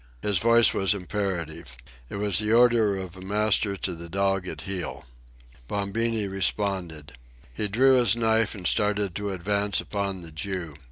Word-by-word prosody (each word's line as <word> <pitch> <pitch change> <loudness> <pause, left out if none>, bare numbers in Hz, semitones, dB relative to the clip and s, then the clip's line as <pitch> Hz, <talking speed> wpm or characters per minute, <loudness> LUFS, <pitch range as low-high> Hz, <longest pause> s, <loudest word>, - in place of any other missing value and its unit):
His 100 -4 +1
voice 115 +2 +5
was 95 +1 +1
imperative. 85 - -4 0.3
It - - -7
was 100 -2 +2
the 105 0 0
order 115 -4 +4
of 95 -1 -7
a 95 - -11
master 100 0 +1
to 95 - -3
the 85 0 -9
dog 95 0 0
at - - -5
heel. 95 -3 -5 0.6
Bombini 105 - -1
responded. 95 -6 -1 0.4
He 105 - -2
drew 130 +6 +4
his 115 -4 +3
knife 115 -1 +1
and 95 -3 -9
started 105 -1 +1
to 105 +2 -4
advance 100 +2 0
upon 100 -2 -3
the 85 -2 -8
Jew. 90 -1 -4
100 Hz, 160 wpm, -26 LUFS, 95-105 Hz, 0.6 s, voice